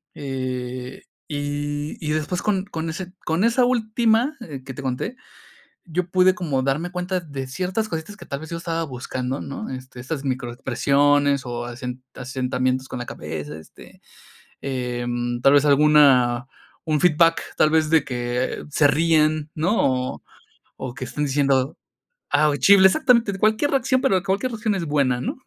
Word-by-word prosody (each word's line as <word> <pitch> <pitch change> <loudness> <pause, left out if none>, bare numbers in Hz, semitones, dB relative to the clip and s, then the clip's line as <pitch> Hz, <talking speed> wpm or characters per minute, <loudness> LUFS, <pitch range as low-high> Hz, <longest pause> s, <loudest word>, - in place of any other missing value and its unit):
Eh, 130 -2 -5 0.2
y 145 0 -3
y 150 - 0
después 155 +4 -1
con 195 -2 0
con 165 -5 -4
ese 180 +2 -6
con 165 +4 +1
esa 240 +2 +3
última, 235 +3 +2
eh, 140 - -8
que 130 - -7
te 140 - -7
conté, 130 - -3 0.7
yo 175 +1 -2
pude 185 0 +4
como 145 -7 -1
darme 150 +6 -1
cuenta 180 +1 -2
de 140 -5 -6
ciertas 185 +9 -2
cositas 165 +5 -5
que - - -12
tal 140 - -4
vez, 160 - -9
yo 170 - -3
estaba 165 -1 -2
buscando, 130 0 -4
¿no? 140 - -6
Este, 130 -1 -8
estas 140 +2 -5
microexpresiones 140 +2 +1
o 120 0 -4
asen 125 +1 -7
asentamientos 130 0 -1
con 125 - -5
la 120 - -5
cabeza, 75 -1 -6
este, 80 - -16 0.6
em, 120 -2 -2
tal 135 - +6
vez, 145 0 +5
alguna 140 -4 +5 0.4
un 155 -2 +1
feedback, 165 -1 +3
tal 155 - +4
vez 160 -1 +2
de 160 -3 +5
que 125 0 -2
se 145 0 +4
ríen, 155 0 +2
¿no? 145 - +1
O - - -14 0.6
o 130 -2 -5
que 130 -1 -6
estén 150 +4 -3
diciendo, 140 0 +1 0.5
ah, 150 +1 +3
o 145 - 0
chifle, 190 +7 +7
exactamente, 235 -4 +3
cualquier 220 +7 +2
reacción, 260 -1 +2
pero 190 -2 +2
cualquier 200 +6 -1
reacción 215 -1 -1
es 170 -3 -2
buena, 135 -4 +1
¿no? - - -3
145 Hz, 165 wpm, -23 LUFS, 130-180 Hz, 0.7 s, chifle